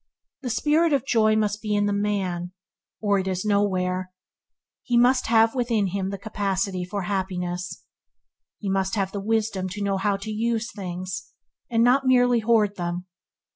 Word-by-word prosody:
The 255 Hz, -, -4 dB
spirit 305 Hz, +6 st, +2 dB
of 270 Hz, -2 st, +1 dB
joy 220 Hz, -4 st, +3 dB
must 210 Hz, -1 st, 0 dB
be 210 Hz, -1 st, -1 dB
in 205 Hz, 0 st, +2 dB
the 205 Hz, -, +1 dB
man 190 Hz, -4 st, -1 dB, 0.5 s
or 205 Hz, -2 st, +2 dB
it 190 Hz, -, -3 dB
is 185 Hz, +1 st, -2 dB
nowhere. 185 Hz, -3 st, 0 dB, 0.7 s
He 245 Hz, -, 0 dB
must 250 Hz, +2 st, +4 dB
have 225 Hz, 0 st, +4 dB
within 235 Hz, -5 st, +1 dB
him 190 Hz, +1 st, -2 dB
the 200 Hz, -, -4 dB
capacity 195 Hz, -2 st, -2 dB
for 195 Hz, +2 st, -4 dB
happiness. 180 Hz, -2 st, -3 dB, 0.7 s
He 205 Hz, -, -6 dB
must 190 Hz, +1 st, 0 dB
have 195 Hz, -2 st, -1 dB
the 200 Hz, -, -4 dB
wisdom 210 Hz, -3 st, -1 dB
to 205 Hz, +3 st, -4 dB
know 200 Hz, -1 st, 0 dB
how 200 Hz, +1 st, +1 dB
to 200 Hz, +2 st, -6 dB
use 225 Hz, +1 st, 0 dB
these -, -, -15 dB
things, 185 Hz, -1 st, -6 dB, 0.4 s
and 230 Hz, -1 st, +3 dB
not 260 Hz, +2 st, +4 dB
merely 245 Hz, -2 st, +4 dB
hoard 215 Hz, -3 st, +2 dB
them. 175 Hz, 0 st, -3 dB
205 Hz, 175 wpm, -24 LUFS, 190-225 Hz, 0.7 s, must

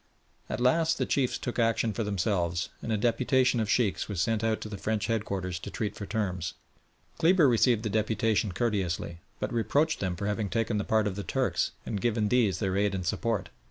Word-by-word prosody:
At 110 Hz, -, -3 dB
last 160 Hz, +6 st, +3 dB
the -, -, 0 dB
chiefs 130 Hz, -3 st, +1 dB
took 120 Hz, -, -4 dB
action 115 Hz, -1 st, +2 dB
for 115 Hz, -, -2 dB
themselves, 90 Hz, -4 st, -1 dB
and 115 Hz, -, -4 dB
a 110 Hz, -, +2 dB
deputation 125 Hz, +3 st, +2 dB
of 110 Hz, -2 st, -1 dB
Sheikhs 110 Hz, -3 st, +1 dB
was 100 Hz, -4 st, -3 dB
sent 110 Hz, +4 st, +1 dB
out 110 Hz, -1 st, +1 dB
to -, -, -5 dB
the 105 Hz, -2 st, -7 dB
French 110 Hz, -2 st, -1 dB
headquarters 100 Hz, -6 st, -2 dB
to 100 Hz, -, -7 dB
treat 105 Hz, 0 st, -3 dB
for 100 Hz, -, -6 dB
terms. 90 Hz, -6 st, -2 dB, 0.6 s
Kleber 165 Hz, -2 st, +5 dB
received 115 Hz, -1 st, +3 dB
the 110 Hz, -, -1 dB
deputation 110 Hz, 0 st, +1 dB
courteously, 90 Hz, -6 st, -1 dB, 0.2 s
but -, -, -3 dB
reproached 145 Hz, +7 st, +1 dB
them 95 Hz, -2 st, -1 dB
for 100 Hz, -, -4 dB
having 105 Hz, 0 st, -1 dB
taken 115 Hz, -1 st, 0 dB
the -, -, -1 dB
part 110 Hz, 0 st, +2 dB
of 100 Hz, -2 st, -2 dB
the 100 Hz, -, -3 dB
Turks, -, -, 0 dB
and 105 Hz, -3 st, -3 dB
given 110 Hz, -3 st, +1 dB
these 115 Hz, -5 st, +3 dB
their 95 Hz, -3 st, -1 dB
aid 100 Hz, -1 st, +1 dB
and 90 Hz, -2 st, -3 dB
support. 105 Hz, 0 st, -1 dB
110 Hz, 205 wpm, -28 LUFS, 100-115 Hz, 0.6 s, Kleber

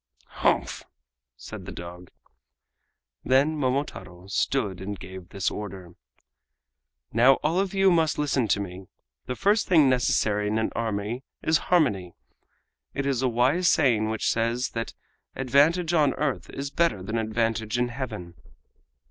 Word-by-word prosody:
"Humph!" -, -, +1 dB, 0.6 s
said -, -, -9 dB
the -, -, -5 dB
dog. 90 Hz, +1 st, -9 dB, 1.1 s
Then 140 Hz, +4 st, +3 dB
Momotaro 125 Hz, -, -3 dB
stood 100 Hz, -1 st, -1 dB
and 100 Hz, +1 st, -5 dB
gave 95 Hz, -1 st, -10 dB
this 100 Hz, -2 st, -1 dB
order: 95 Hz, -4 st, -7 dB, 1.2 s
"Now 125 Hz, +5 st, +6 dB
all 160 Hz, +5 st, +1 dB
of 195 Hz, 0 st, -1 dB
you 195 Hz, -1 st, +5 dB
must 165 Hz, -3 st, +2 dB
listen 140 Hz, -5 st, +1 dB
to 100 Hz, -, +2 dB
me. 95 Hz, -1 st, -7 dB, 0.4 s
The 125 Hz, -, -3 dB
first 205 Hz, -, +2 dB
thing 160 Hz, -6 st, +5 dB
necessary 105 Hz, -4 st, +1 dB
in 105 Hz, +1 st, 0 dB
an 110 Hz, -, 0 dB
army 110 Hz, +2 st, -2 dB, 0.2 s
is 160 Hz, -1 st, +3 dB
harmony. 105 Hz, -, +2 dB, 0.8 s
It 140 Hz, -, -2 dB
is 135 Hz, -3 st, 0 dB
a 130 Hz, -, +2 dB
wise 130 Hz, +10 st, +2 dB
saying 115 Hz, -10 st, +3 dB
which 110 Hz, 0 st, -2 dB
says 115 Hz, +2 st, 0 dB
that 115 Hz, 0 st, -5 dB, 0.4 s
'Advantage 150 Hz, +7 st, +2 dB
on 150 Hz, -5 st, +3 dB
earth 145 Hz, -2 st, -2 dB
is 140 Hz, +1 st, -5 dB
better 165 Hz, -, +1 dB
than 110 Hz, +4 st, -2 dB
advantage 110 Hz, +1 st, -1 dB
in 120 Hz, 0 st, +1 dB
Heaven! 115 Hz, -9 st, -6 dB
120 Hz, 140 wpm, -26 LUFS, 105-145 Hz, 1.2 s, Now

